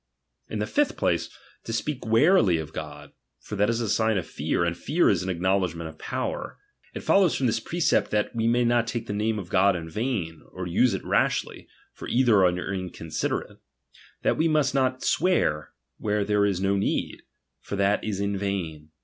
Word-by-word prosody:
In - - -4
the - - -1
fifth 295 -1 0
place, 85 -1 0 0.3
to - - -6
speak 125 +2 -3
warily 115 - +4
of 80 -1 -6
God; 75 -1 -8 0.3
for - - -7
■that 105 +1 +2
is 115 0 0
a 115 - -1
sign 110 0 +2
oi 90 - -1
fear, 80 - -2
?mAfear 85 - +2
is 85 - +1
an 95 - -4
acknowledg 95 0 0
ment 85 -1 -6
oi - - -19
power. - - -4 0.4
It - - -4
follows 190 -4 +3
from 135 - 0
this 115 -2 +1
precept, 170 +8 +1
that 105 +2 -1
t^e 115 0 +1
may 120 +1 +2
not 120 -1 +2
take 115 -1 -3
the 105 - -4
name 110 +1 0
of 95 -4 -6
God 95 +1 +4
in 80 -2 -5
vain, 90 - -3
or 90 0 -5
use 95 +6 +2
■it - - -6
rashly; - - 0 0.3
for - - -9
either 120 -6 +4
are 90 +2 +1
inconsiderate. 90 -4 -4 0.6
That - - +2
we 160 - +2
^nust 150 -5 +2
not 130 -1 0
swear, 155 - +1 0.3
where 105 -1 0
there 105 0 +2
is 95 -3 -1
no 100 +1 +1
need; 100 - -1 0.4
for - - -6
that 100 +1 +1
is 105 -3 -3
in 100 0 -1
vain. 85 -6 -3
100 Hz, 195 wpm, -26 LUFS, 90-120 Hz, 0.6 s, warily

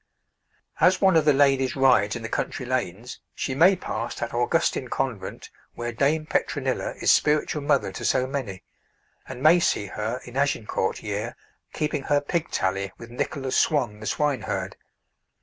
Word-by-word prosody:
As 185 +1 +4
one 190 -3 +4
of 160 -2 +4
the 150 - +6
ladies 135 -2 +3
rides 125 -6 +3
in 115 - -6
the - - -3
country 125 - -3
lanes, 120 -2 -3 0.2
she 130 - -2
may 175 +8 +5
pass 120 -8 -4
that 120 - -4
Augustine 130 +2 +1
convent 125 -5 -4 0.2
where 120 0 -4
Dame 145 +6 +1
Petronilla - - -1
is - - +4
spiritual 150 0 +2
Mother 140 -8 +1
to - - -7
so 130 - +2
many, 130 -9 -5 0.6
and 130 0 -8
may 165 +3 +7
see 105 - +1
her 110 +5 -4
in 125 +2 -8
Agincourt 130 -8 -1
year 105 +2 -3 0.4
keeping 150 -2 -2
her 145 0 +3
pig 165 +3 -2
tally 95 +1 -1
with 115 0 -11
Nicholas 135 +2 -3
Swon, 125 -9 +1
the 110 - -7
swineherd. 110 -9 -1
130 Hz, 160 wpm, -25 LUFS, 110-145 Hz, 0.6 s, may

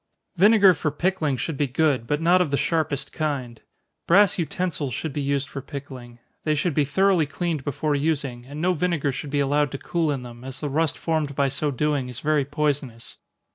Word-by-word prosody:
_ - - -13
Vinegar 200 -1 +7
for 155 - -1
pickling 155 -2 0
should 155 +3 -3
be 145 - +1
good, 135 -3 +1
but 150 0 0
not 175 +3 +4
of 175 - +1
the 140 - +1
sharpest 155 -4 -1
kind. 135 -7 -3 0.5
Brass 195 +2 +5
utensils 165 -6 -2
should 160 -4 -4
be 145 - -2
used 140 0 -1
for 140 0 -6
pickling. 130 -4 -9 0.3
They 155 -1 +1
should 155 +2 0
be 145 0 +2
thoroughly 190 0 +2
cleaned 160 -1 -2
before 145 +2 -1
using, 140 -4 -1
and 145 +2 -7
no 180 +3 +2
vinegar 170 -4 0
should 140 +2 -6
be 145 0 +1
allowed 145 +1 +2
to - - -2
cool 165 +2 -1
in 135 -3 -3
them, 120 0 -11
as 135 0 -7
the 145 - -3
rust 155 +2 0
formed 155 -4 -1
by 140 -1 +2
so 145 +3 -2
doing 140 -1 -1
is 125 -1 -7
very 150 -2 +1
poisonous. 140 -5 -3
145 Hz, 210 wpm, -24 LUFS, 135-160 Hz, 0.5 s, Vinegar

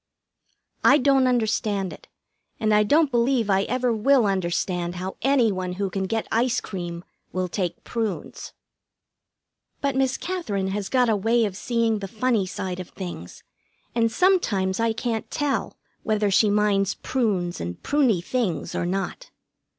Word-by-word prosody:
I 280 - +7
don't 270 -2 +3
understand 215 -5 0
it, - - -14 0.5
and 215 -1 +2
I 210 - +5
don't 290 +7 +3
believe 240 -2 +2
I 195 +1 +3
ever 250 0 0
will 245 +2 +3
understand 180 -2 -1
how 185 +2 -5
any 260 -4 +3
one 185 -1 -3
who 195 +1 -2
can 190 0 -2
get 225 +3 -1
ice 240 +2 +2
cream 175 -3 -6 0.3
will 185 0 -1
take 180 -1 -3
prunes. 225 -4 -4 1.3
But 280 -1 -1
Miss 265 -1 +1
Katherine 215 - -2
has 200 0 -3
got 250 -2 +3
a 220 - +3
way 225 +3 +2
of 200 -3 -4
seeing 230 0 0
the 195 - -5
funny 220 -1 0
side 185 0 -4
of 180 - -7
things, 175 - -8 0.5
and 230 -1 +2
sometimes 220 - +2
I 230 0 +2
can't 225 -1 -3
tell 290 -1 -2 0.2
whether 215 -2 +1
she 210 +2 +4
minds 200 -1 +2
prunes 195 -9 -1
and 85 +1 -5
pruny 255 -12 +2
things 220 -7 -2
or 175 - -1
not. 195 - -3
215 Hz, 155 wpm, -24 LUFS, 190-245 Hz, 1.3 s, I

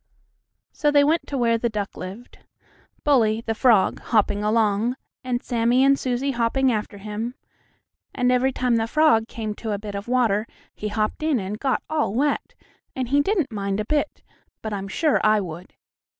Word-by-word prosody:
So 295 - +1
they 290 -1 +5
went 320 +3 +1
to 280 - -3
where 230 -2 +2
the 235 - 0
duck 210 -2 -4
lived. 195 +7 -9 0.6
Bully, 225 -6 +3
the 225 - 0
frog, 220 -4 +3
hopping 210 -2 +1
along, 215 +2 +1 0.3
and 250 -1 -2
Sammie 240 +1 +2
and 275 0 +4
Susie 255 +2 -1
hopping 255 +2 +1
after 210 -2 -3
him, 215 +4 -5 0.8
and 250 0 +2
every 255 +1 +2
time 250 -2 +1
the 225 0 0
frog 265 -5 +3
came 215 -3 -4
to 220 0 -4
a - - -1
bit 205 0 -7
of 200 +2 -5
water 230 -4 +1 0.3
he 210 - -5
hopped 215 +4 -2
in 305 -5 +1
and 200 +2 -5
got 270 -2 0
all 300 -10 -1
wet, 285 +4 0 0.4
and 255 -3 -3
he 285 +2 +4
didn't 335 - 0
mind 200 -1 -2
it - - 0
a - - -13
bit, 300 +4 -1 0.4
but 220 -1 -4
I'm 195 -1 -4
sure 300 +9 +1
I 215 0 +4
would. 180 -1 -8
230 Hz, 185 wpm, -23 LUFS, 210-265 Hz, 0.8 s, they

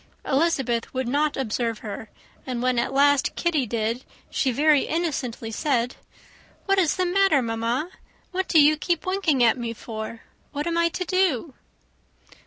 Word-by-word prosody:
Elizabeth 270 -5 +1
would 260 -1 -1
not 290 +4 +1
observe 230 -2 -1
her; 210 +1 -6 0.4
and 250 -2 -3
when 250 -1 +2
at 235 - -1
last 285 0 +3
Kitty 315 -7 0
did, 230 +3 -2 0.3
she 265 - +1
very 295 +3 +3
innocently 270 -9 -2
said, 250 0 0 0.7
"What 390 -1 +3
is 340 -5 +2
the 370 - 0
matter, 360 -6 +3
mamma? 230 +8 -2 0.4
What 375 +1 -2
do 320 - +5
you 300 +1 +6
keep 340 +1 -1
winking 370 -9 +1
at 235 +2 +4
me 235 -1 -3
for? 220 0 -7 0.3
What 290 0 -3
am 340 0 -1
I 335 0 +3
to 365 +2 -4
do?" 335 -6 +1
275 Hz, 160 wpm, -24 LUFS, 235-335 Hz, 0.7 s, you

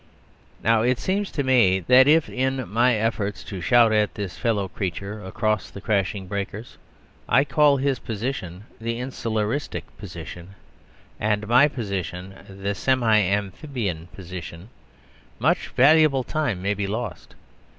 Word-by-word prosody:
Now, 115 0 +3
it 125 +2 +2
seems 195 - -1
to 140 - -2
me, 120 -8 +4
that 125 +9 +6
if, 155 +1 +5
in 130 -1 -2
my 120 +5 +3
efforts 105 -3 -2
to 95 -3 -7
shout 115 +6 +5
at 105 -1 +1
this 100 -3 -5
fellow 110 -5 0
creature 100 +3 -5
across 110 +1 -1
the - - -10
crashing 100 -2 -1
breakers, 100 +3 -5 0.5
I 135 - +5
call 145 0 +3
his 135 -2 0
position 105 -5 -5 0.2
the 115 +1 -3
"insularistic 115 0 -2 0.2
position," 90 +3 -9 0.6
and 105 0 0
my 125 +6 +6
position 95 - -5 0.2
"the 100 +1 -3
semi 115 0 +2
amphibian 100 - -2
position," 90 0 -9 0.7
much - - +1
valuable 145 0 +4
time 125 -11 -2
may 100 +1 +1
be 100 -1 -3
lost. 110 +1 -5
110 Hz, 135 wpm, -24 LUFS, 100-130 Hz, 0.7 s, that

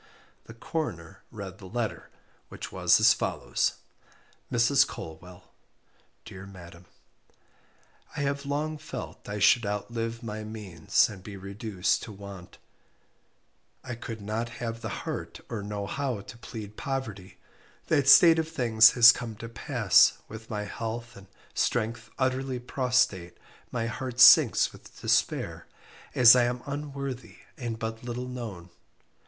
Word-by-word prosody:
The 115 - -12
Coroner 115 - -5
read - - -9
the - - -10
letter, - - -4 0.4
which - - -8
was - - +4
as - - +6
follows: - - -1 0.8
"Mrs. 130 +4 +4
Colwell, 90 +3 -10 0.7
"Dear 100 -3 -10
Madam, 85 -2 -13 1.3
"I - - -1
have 140 0 -1
long 150 +2 -3
felt 155 +2 -8 0.2
should 120 +2 +5
I 100 - -2
outlive 115 +3 -4
my 110 -1 -5
means 105 -7 0
and 100 -3 -10
be 100 +1 -9
reduced 100 0 -2
to 110 - -8
want 100 -3 -11 1.3
I 125 - -6
could 115 -2 -7
not 110 +3 -3
have 115 -1 -5
the 110 - -4 0.2
heart - - -5
or 110 - -4
know 100 0 -4
how 130 -2 -3
to 105 +3 -12
plead 105 -3 -9
poverty, 115 -9 -5 0.5
that 140 -3 +2
state 165 +2 +8
of 160 0 -2
things 115 -7 +5
has 120 0 +9
come 120 -3 -6
to 115 +2 -8
pass, 115 - +4
with 110 +1 -10
my 105 -2 -3
health 115 +3 -6
and 100 0 -14 0.3
strength 115 0 -1
utterly 130 0 -1
prostrate 125 -8 0 0.3
my 115 -2 -2
heart 125 +1 -5
sinks 130 - +7
with - - -15
despair, - - 0 0.5
as 120 -1 +9
I 125 -1 +4
am 120 0 -3
unworthy 140 -6 -6 0.2
and 120 -4 -5
but 110 0 -5
little 125 +1 -5
known. 110 -9 -7
115 Hz, 135 wpm, -27 LUFS, 105-125 Hz, 1.3 s, has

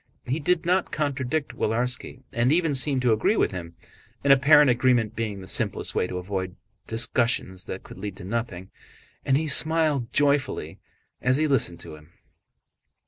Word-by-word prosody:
He 135 +6 -2
did 165 +2 0
not 180 +1 +1
contradict 145 0 -2
Willarski 125 +3 -2
and 120 +3 +1
even 165 -2 +2
seemed 135 -1 +1
to 120 -3 +4
agree 110 - +1
with - - +2
him—an 90 +8 -5
apparent 140 0 +6
agreement 120 -2 +1
being 105 -4 -4
the 95 - -11
simplest - - -1
way - - 0
to 90 - -5
avoid 95 0 -4 0.3
discussions 115 -4 0
that 95 - -7
could - - -12
lead 100 -1 -6
to 100 - -10
nothing—and 110 +5 -5
he 160 +1 -2
smiled 155 -4 +2
joyfully 145 -1 0 0.4
as 130 +1 +2
he 155 - +1
listened 110 - +1
to - - -9
him. 75 +2 -15
125 Hz, 155 wpm, -25 LUFS, 100-145 Hz, 0.4 s, apparent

